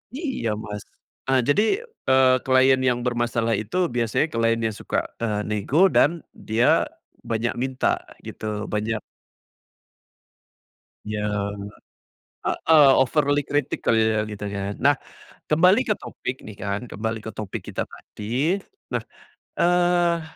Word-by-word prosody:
Iya 265 Hz, -, -2 dB
Mas, 105 Hz, 0 st, -6 dB, 0.5 s
nah 135 Hz, 0 st, +3 dB
jadi, 145 Hz, +9 st, +4 dB, 0.4 s
eee, 130 Hz, -1 st, +5 dB
klien 130 Hz, 0 st, +5 dB
yang 120 Hz, -1 st, 0 dB
bermasalah 120 Hz, -1 st, 0 dB
itu 110 Hz, -, -4 dB, 0.2 s
biasanya 120 Hz, +4 st, +1 dB
klien 115 Hz, -1 st, +1 dB
yang 110 Hz, -, +1 dB
suka, -, -, -2 dB, 0.2 s
eee, 105 Hz, -3 st, -1 dB
nego 105 Hz, +7 st, -1 dB, 0.2 s
dan 165 Hz, +1 st, +3 dB, 0.2 s
dia 115 Hz, +3 st, +3 dB, 0.4 s
banyak 115 Hz, +1 st, 0 dB
minta 130 Hz, 0 st, 0 dB, 0.3 s
gitu, -, -, -8 dB, 0.3 s
banyak 110 Hz, +1 st, -1 dB, 2.1 s
Yang 105 Hz, -1 st, -3 dB, 0.8 s
heeh, 155 Hz, -3 st, +5 dB
overly 145 Hz, +2 st, +2 dB
kritik 145 Hz, +1 st, -2 dB
kali 115 Hz, -, +3 dB, 0.2 s
ya 105 Hz, -, +2 dB
gitu 105 Hz, -1 st, -6 dB
ya. 100 Hz, 0 st, -3 dB
Nah 145 Hz, +2 st, +4 dB, 0.5 s
kembali 180 Hz, +9 st, +5 dB
ke 210 Hz, -, +2 dB
topik 130 Hz, -7 st, -6 dB
nih 110 Hz, -, -9 dB
kan, 100 Hz, 0 st, -2 dB
kembali 110 Hz, +1 st, -3 dB
ke 110 Hz, -, -6 dB
topik 105 Hz, -2 st, -6 dB
kita -, -, -3 dB
tadi 135 Hz, -, -2 dB, 0.3 s
nah, -, -, 0 dB, 0.6 s
eee, 175 Hz, -1 st, +3 dB
120 Hz, 125 wpm, -24 LUFS, 105-145 Hz, 2.1 s, eee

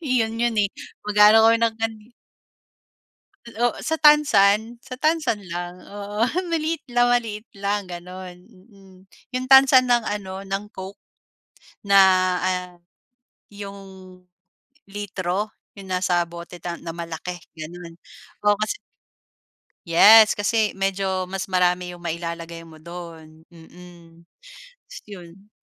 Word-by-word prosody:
'yon 230 Hz, -5 st, 0 dB
'yon 235 Hz, 0 st, 0 dB
eh, 200 Hz, -, +1 dB, 0.4 s
mag-aano 210 Hz, +1 st, +6 dB
kami 230 Hz, -, +5 dB
ng 225 Hz, -1 st, +2 dB
kan. 225 Hz, 0 st, -1 dB, 1.5 s
O 235 Hz, +1 st, -1 dB
sa 320 Hz, -, -3 dB
tansan, 235 Hz, -7 st, +4 dB
sa 255 Hz, -1 st, -9 dB
tansan 310 Hz, -5 st, +1 dB
lang. 175 Hz, +1 st, -6 dB
Oo, 205 Hz, +2 st, -3 dB, 0.2 s
maliit 325 Hz, -1 st, -1 dB
lang 245 Hz, 0 st, +3 dB
maliit 225 Hz, -3 st, -2 dB
lang 200 Hz, 0 st, -2 dB
gano'n, 180 Hz, 0 st, -9 dB
mm. 195 Hz, -2 st, -20 dB, 0.3 s
'Yong 255 Hz, 0 st, -3 dB
tansan 265 Hz, -1 st, +7 dB
ng 240 Hz, -1 st, +3 dB
ano, 195 Hz, -3 st, -5 dB
ng 195 Hz, +1 st, -4 dB
Coke 190 Hz, +1 st, -9 dB, 0.9 s
na 200 Hz, 0 st, +4 dB, 0.4 s
ah, 180 Hz, 0 st, -2 dB, 0.8 s
'yong 200 Hz, -1 st, -9 dB, 1.1 s
litro 200 Hz, 0 st, -4 dB, 0.2 s
'yong 195 Hz, -2 st, -12 dB
nasa 180 Hz, -1 st, +1 dB
bote 170 Hz, +1 st, -10 dB
na 170 Hz, -1 st, -6 dB
malaki 170 Hz, +1 st, -6 dB, 0.2 s
gano'n. 170 Hz, +1 st, -9 dB, 0.5 s
Oo 205 Hz, -, +6 dB
kasi, 410 Hz, -, -2 dB, 1.1 s
yes 210 Hz, +5 st, +7 dB
kasi 215 Hz, 0 st, +1 dB
medyo 195 Hz, -1 st, -2 dB
mas 190 Hz, +1 st, -5 dB
marami 180 Hz, -1 st, +1 dB
'yong 175 Hz, -, -11 dB
mailalagay 170 Hz, 0 st, -5 dB
mo 160 Hz, -1 st, -15 dB
do'n, 165 Hz, -1 st, -11 dB
mm. 170 Hz, 0 st, -16 dB, 0.6 s
Tapos -, -, -11 dB
yun. 195 Hz, +1 st, -13 dB
195 Hz, 115 wpm, -22 LUFS, 175-225 Hz, 1.5 s, tansan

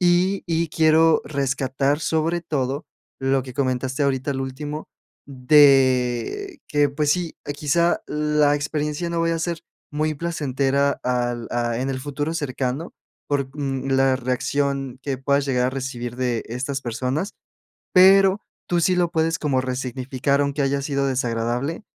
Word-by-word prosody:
y 180 Hz, +2 st, +2 dB
y 165 Hz, -1 st, 0 dB
quiero 160 Hz, 0 st, +4 dB
rescatar 135 Hz, 0 st, 0 dB
sobre 160 Hz, +2 st, 0 dB
todo 140 Hz, -3 st, -2 dB, 0.3 s
lo 135 Hz, 0 st, +1 dB
que 130 Hz, -1 st, -10 dB
comentaste 130 Hz, 0 st, -1 dB
ahorita 135 Hz, +1 st, 0 dB
al 135 Hz, -, -3 dB
último, 145 Hz, +3 st, -6 dB, 0.4 s
de 135 Hz, -, +3 dB
que 145 Hz, -1 st, +3 dB
pues 145 Hz, +1 st, 0 dB
sí, 175 Hz, -3 st, -3 dB, 0.2 s
quizá 170 Hz, +4 st, +1 dB
la 150 Hz, -1 st, +2 dB
experiencia 150 Hz, +3 st, -2 dB
no 170 Hz, 0 st, -1 dB
vaya 165 Hz, 0 st, +1 dB
a -, -, -4 dB
ser 170 Hz, -1 st, -2 dB, 0.3 s
muy 155 Hz, +1 st, 0 dB
placentera 140 Hz, -3 st, 0 dB
al 120 Hz, -2 st, -1 dB
ah, 120 Hz, -1 st, -1 dB
en 135 Hz, +1 st, -1 dB
el 130 Hz, -, -3 dB
futuro 145 Hz, +3 st, -3 dB
cercano 135 Hz, +1 st, -3 dB, 0.3 s
por, 140 Hz, -2 st, 0 dB
mm, 135 Hz, -1 st, -2 dB
la 135 Hz, 0 st, +4 dB
reacción 135 Hz, +1 st, -1 dB
que 135 Hz, -2 st, -3 dB
puedas 140 Hz, +1 st, +1 dB
llegar 125 Hz, -2 st, +1 dB
a -, -, -3 dB
recibir 125 Hz, -3 st, -5 dB
de 125 Hz, -3 st, -1 dB
estas 130 Hz, +3 st, -3 dB
personas. 130 Hz, -, -2 dB, 0.6 s
Pero 195 Hz, +2 st, +6 dB, 0.3 s
tú 175 Hz, -1 st, +2 dB
sí 180 Hz, +3 st, +3 dB
lo 175 Hz, -1 st, +1 dB
puedes, 165 Hz, 0 st, +1 dB
como 135 Hz, -4 st, +1 dB
resignificar, 130 Hz, +2 st, -1 dB
aunque 140 Hz, 0 st, -1 dB
haya 140 Hz, 0 st, 0 dB
sido 140 Hz, -1 st, -1 dB
desagradable. 125 Hz, -, -1 dB
140 Hz, 145 wpm, -23 LUFS, 130-155 Hz, 0.6 s, Pero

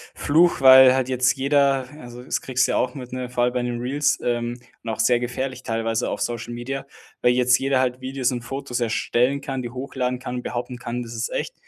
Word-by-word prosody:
Fluch, 165 Hz, +3 st, +3 dB
weil 130 Hz, -1 st, +9 dB
halt 130 Hz, -1 st, 0 dB
jetzt 130 Hz, 0 st, +2 dB
jeder 140 Hz, -1 st, +2 dB
also, 120 Hz, 0 st, -10 dB
das -, -, -2 dB
kriegst 125 Hz, -1 st, +1 dB
du -, -, -1 dB
ja -, -, +1 dB
auch 125 Hz, 0 st, -1 dB
mit, 125 Hz, -2 st, -8 dB
ne, 125 Hz, -1 st, -4 dB
vor 125 Hz, -1 st, 0 dB
allem 125 Hz, 0 st, +1 dB
bei 125 Hz, -, 0 dB
den 120 Hz, -1 st, -3 dB
Reels 140 Hz, +4 st, 0 dB
ähm, 120 Hz, 0 st, -2 dB, 0.2 s
und 115 Hz, -, -5 dB
auch 110 Hz, -, -4 dB
sehr 120 Hz, -1 st, +3 dB
gefährlich 130 Hz, +2 st, -4 dB
teilweise 115 Hz, 0 st, -1 dB
auf -, -, -4 dB
Social 120 Hz, 0 st, -3 dB
Media, 135 Hz, +3 st, -5 dB, 0.3 s
weil 125 Hz, -, +4 dB
jetzt 125 Hz, 0 st, +3 dB
jeder 135 Hz, -1 st, +1 dB
halt 125 Hz, 0 st, -1 dB
Videos 130 Hz, 0 st, -1 dB
und 125 Hz, -1 st, -3 dB
Fotos 125 Hz, 0 st, -4 dB
erstellen 120 Hz, +3 st, +1 dB
kann, 135 Hz, -2 st, -4 dB
die 120 Hz, -, -5 dB
hochladen 125 Hz, 0 st, -3 dB
kann, 125 Hz, 0 st, -5 dB
behaupten 120 Hz, 0 st, -5 dB
kann: 120 Hz, +1 st, -4 dB
„Das 115 Hz, 0 st, -9 dB
ist 115 Hz, 0 st, -3 dB
echt.“ -, -, -3 dB
125 Hz, 225 wpm, -23 LUFS, 120-130 Hz, 0.3 s, weil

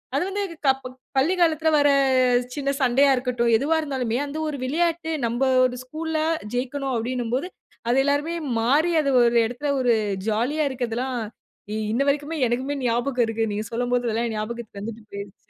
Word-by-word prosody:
அது -, -, +2 dB
வந்து 405 Hz, +1 st, -2 dB
இது 335 Hz, -, -10 dB
க -, -, +5 dB
ப -, -, -5 dB, 0.3 s
பள்ளி 305 Hz, +8 st, +3 dB
காலத்துல 320 Hz, -1 st, +3 dB
வரச் 260 Hz, -3 st, +3 dB
சின்ன 275 Hz, -1 st, -2 dB
சண்டையா 270 Hz, +2 st, +4 dB
இருக்கட்டும், 245 Hz, -2 st, 0 dB
எதுவா 305 Hz, +6 st, +1 dB
இருந்தாலுமே 255 Hz, -5 st, -2 dB
அந்த 290 Hz, +2 st, -6 dB
ஒரு 285 Hz, -, -4 dB
விளையாட்டு 330 Hz, +3 st, 0 dB, 0.2 s
நம்ப 240 Hz, +3 st, -3 dB, 0.2 s
ஒரு 250 Hz, 0 st, -2 dB
ஸ்கூல்ல 315 Hz, +3 st, -3 dB, 0.4 s
ஜெயிக்கணும் 265 Hz, +1 st, -2 dB
அப்டின்னும்போது 245 Hz, +5 st, -2 dB, 0.4 s
அது 245 Hz, -, +3 dB
எல்லாருமே 290 Hz, +4 st, 0 dB, 0.3 s
மாறி 295 Hz, +9 st, +3 dB
அது 280 Hz, -, 0 dB
ஒரு 235 Hz, 0 st, +3 dB
இடத்துல 245 Hz, +5 st, -3 dB
ஒரு 245 Hz, -2 st, +3 dB, 0.3 s
ஜாலியா 250 Hz, +9 st, +1 dB
இருக்குறதுலாம், 250 Hz, 0 st, -3 dB, 0.6 s
இ -, -, -2 dB, 0.2 s
இன்ன 240 Hz, +5 st, +1 dB
வரைக்குமே 290 Hz, +3 st, 0 dB
எனக்குமே 260 Hz, +4 st, -1 dB
ஞாபகம் 245 Hz, +1 st, +1 dB
இருக்கு. 225 Hz, 0 st, -2 dB
நீங்கச் 210 Hz, +2 st, -4 dB
சொல்லும்போது 245 Hz, +1 st, 0 dB
எல்லாம் 230 Hz, 0 st, -1 dB
ஞாபகத்துக்கு 215 Hz, -1 st, -5 dB
வந்துட்டு 225 Hz, +2 st, -7 dB
போயிருச்சு 200 Hz, -1 st, -9 dB
255 Hz, 165 wpm, -24 LUFS, 235-290 Hz, 0.6 s, க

